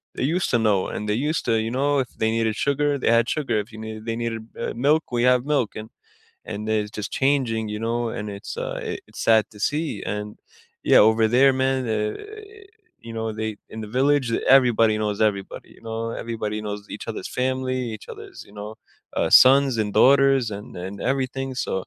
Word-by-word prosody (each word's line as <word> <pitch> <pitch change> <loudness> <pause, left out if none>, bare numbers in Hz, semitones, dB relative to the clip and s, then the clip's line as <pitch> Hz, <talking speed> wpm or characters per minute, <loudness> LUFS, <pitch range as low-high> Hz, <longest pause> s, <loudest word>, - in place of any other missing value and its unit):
they - - -3
used 170 +6 0
to 120 - +3
know 105 -4 +2
and 105 - -5
they 105 - +1 0.2
used 160 - -1
to, 115 - +2
you - - -2
know, 140 +3 +1
if 130 -3 -2
they 110 0 +1
needed 115 -1 0
sugar, 145 +2 +1
they 125 - +1
had 115 0 +3
sugar, 135 -8 0
if 105 +3 -6
you 110 - -11
needed 110 0 -7
they 115 - -2
needed, 115 -1 -3 0.2
uh, - - -3
milk, 145 +6 +2
we 120 -1 0
have 125 0 +3
milk 140 -7 0
and 110 +1 -7 0.6
and, 105 +1 -5
uh, - - +1
it's 105 -1 0
just 105 -1 -5
changing, 130 -5 +1
you 105 0 -4
know, 115 +1 -1
and 105 -1 -5
it's, 100 0 -7
uh - - -4 0.3
it's - - -9
sad 110 -1 +6
to 105 - -15
see, 145 -2 -1
and 105 0 -5 0.4
yeah, - - +5
over 110 0 +2
there, 130 +4 +5
man, 130 0 0
eh 105 -1 -1 0.9
you 115 - -9
know, 110 0 -3
they, 110 0 -4
in 110 - -8
the 110 - -6
village, 135 +2 +2 0.3
everybody 115 -4 +2
knows 105 -1 -2
everybody, 100 -3 -1
you - - -18
know? 115 0 -4
Everybody 110 -2 -4
knows 105 -1 -5
each - - -8
other's - - -5
family, 130 0 -1 0.2
each 105 - -14
other's, - - -10
you - - -19
know, 105 +1 -8 0.4
uh, - - +1
sons 135 -1 +6
and 105 -2 -1
daughters 135 -1 +5
and 105 - -10
and 95 +2 -6 0.2
everything, 135 0 -2
so, - - -4
115 Hz, 210 wpm, -23 LUFS, 110-130 Hz, 0.9 s, sad